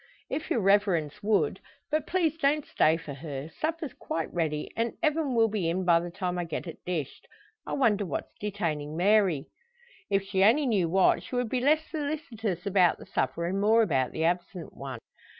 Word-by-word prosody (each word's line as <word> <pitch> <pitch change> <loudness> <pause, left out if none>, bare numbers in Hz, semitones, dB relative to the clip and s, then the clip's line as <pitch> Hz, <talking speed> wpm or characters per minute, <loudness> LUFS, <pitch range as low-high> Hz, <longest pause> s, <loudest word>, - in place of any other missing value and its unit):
"If 315 - -3
your 230 - +1
reverence 195 -4 +2
would. 210 -1 +1 0.3
But 310 +1 0
please 335 -4 +1
don't 300 -1 +1
stay 160 +1 +3
for 155 -3 -8
her. 140 0 -6
Supper's 315 - -3
quite 165 - -4
ready, 155 -3 -1
and 230 0 -1
Evan 305 -4 +1
will 225 -1 +5
be 205 -6 -1
in 185 +2 -1
by 170 -1 +5
the 175 +1 -5
time 180 0 -3
I - - 0
get 165 +1 -4
it 165 - -9
dished. 165 -6 -4 0.4
I - - -3
wonder 215 -7 +2
what's 170 -7 -4
detaining 160 -7 -3
Mary!" 185 -6 +3 0.6
If 195 -1 +2
she 195 -1 +1
only 250 +9 +5
knew 200 -9 +1
what, 190 +2 +4
she - - -7
would 245 -2 0
be 250 +1 0
less 305 +4 +4
solicitous 280 - -3
about 185 -4 +3
the - - -12
supper, 130 +6 -1
and 190 +3 -1
more 225 +2 +5
about 135 - +1
the 160 - -2
absent 175 +1 -2
one. 135 -3 -6
195 Hz, 190 wpm, -28 LUFS, 165-235 Hz, 0.6 s, will